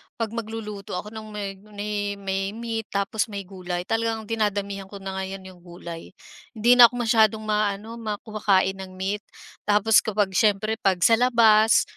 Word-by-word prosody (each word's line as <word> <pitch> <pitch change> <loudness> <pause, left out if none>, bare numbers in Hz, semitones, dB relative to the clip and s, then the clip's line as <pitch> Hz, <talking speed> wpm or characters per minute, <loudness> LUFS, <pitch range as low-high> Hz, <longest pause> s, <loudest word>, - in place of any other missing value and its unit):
'pag 225 -2 -3
magluluto 220 -4 -6
ako 210 +4 -5
ng 220 -1 -8
meg 200 -2 -6 0.2
me 205 0 -3
may 195 0 -3
meat 225 -1 -4
tapos 200 +3 -1
may 200 -2 -6
gulay, 180 -2 -5
talagang 225 +2 -1
dinadamihan 205 -3 -2
ko 200 - -10
na 190 0 -4
ngayon 190 0 -5
yung 185 -1 -13
gulay. 170 -1 -10 0.4
Hindi 240 +3 +4
na 240 - +12
ako 245 - -11
masyadong 220 -2 +3
maaano 215 +1 -1
mak 215 -2 -4
kumakain 195 -3 +1
ng 185 -1 -9
meat. 195 +3 -2 0.5
Tapos 210 +1 +5
kapag 205 -2 0
siyempre 215 +2 +1
'pag 190 -4 +1
sa 225 +3 +5
labas, 225 -3 +5
210 Hz, 165 wpm, -24 LUFS, 195-220 Hz, 0.5 s, na